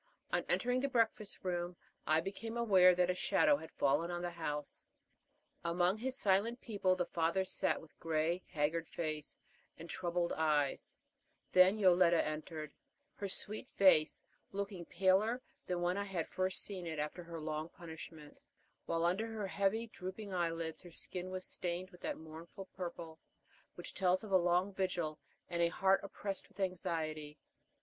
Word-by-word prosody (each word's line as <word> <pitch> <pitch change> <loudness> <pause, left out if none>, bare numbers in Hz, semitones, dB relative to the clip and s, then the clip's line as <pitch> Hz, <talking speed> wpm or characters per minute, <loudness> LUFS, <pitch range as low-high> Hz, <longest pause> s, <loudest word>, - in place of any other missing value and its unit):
On - - +2
entering 250 0 +2
the 275 - +1
breakfast 225 -4 0
room 175 -1 -2 0.3
I 155 +1 +4
became 225 +6 -5
aware 190 -6 +6
that 180 0 +3
a - - 0
shadow 290 +10 +4
had 160 - -9
fallen 145 +5 +2
on 175 0 -3
the 175 - -2
house. 150 -4 -4 0.8
Among 175 +2 +2
his 260 +2 -2
silent 210 +4 +2
people 200 -6 +1
the 180 -1 0
father 170 +4 +1
sat - - +1
with 160 - -17
gray, 165 +2 0
haggard 160 +1 0
face 155 -3 -4 0.4
and 165 - -8
troubled 175 0 -1
eyes; 150 -3 +1 0.6
then 185 +3 +7
Yoletta 180 -4 +5
entered, 155 0 -5 0.4
her 200 - -4
sweet 215 +3 -3
face 185 -6 +5 0.3
looking 195 -3 -4
paler 195 +7 +3 0.3
than 180 -1 -1
when 180 +2 +1
I 200 - -1
had 180 -5 -2
first 185 0 +1
seen 185 -4 -4
it 160 -1 -4
after 150 +4 -3
her 170 -1 -7
long 155 +1 -3
punishment, 160 -3 -10 0.5
while 165 0 +1
under 190 +6 +1
her 220 -2 -3
heavy, 200 +4 +1
drooping 200 -1 -7
eyelids 165 -2 -1
her 175 - -12
skin 180 +2 -5
was 185 0 -4
stained 180 +1 -3
with 180 - -16
that - - -2
mournful 160 +4 -9
purple 170 -3 -6 0.6
which 175 - -8
tells 185 +1 +2
of 210 - -8
a - - +5
long 180 +2 +3
vigil 175 -5 -1 0.3
and 170 0 -1
a 170 - +5
heart 190 +3 +3
oppressed 200 0 -4
with 205 -1 -22
anxiety. 155 -5 -2
180 Hz, 160 wpm, -36 LUFS, 165-195 Hz, 0.8 s, then